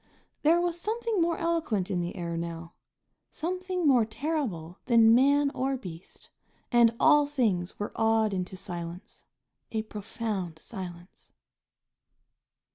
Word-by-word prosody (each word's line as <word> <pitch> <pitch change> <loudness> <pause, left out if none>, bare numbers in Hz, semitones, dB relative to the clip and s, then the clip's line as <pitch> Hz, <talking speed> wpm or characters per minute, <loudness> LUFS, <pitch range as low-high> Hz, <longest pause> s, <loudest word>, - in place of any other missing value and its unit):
There 325 +3 +4
was 345 -1 -1
something 445 -2 -1
more 335 0 +1
eloquent 315 - -1
in 180 -2 0
the 175 +1 -4
air 170 -1 -4
now, 170 0 -5 0.6
something 365 0 -2
more 255 -5 +5
terrible 220 - -3
than 230 -2 +6
man 280 +3 +4
or 270 0 -1
beast, 180 -6 -11 0.4
and 235 -2 +5
all 295 -2 +5
things 215 -11 0
were 205 - -4
awed 220 -1 +2
into 185 0 -3
silence 175 -1 -7 0.5
a 220 -1 -1
profound 210 -5 -4
silence. 175 -1 -9
225 Hz, 120 wpm, -28 LUFS, 180-295 Hz, 0.6 s, than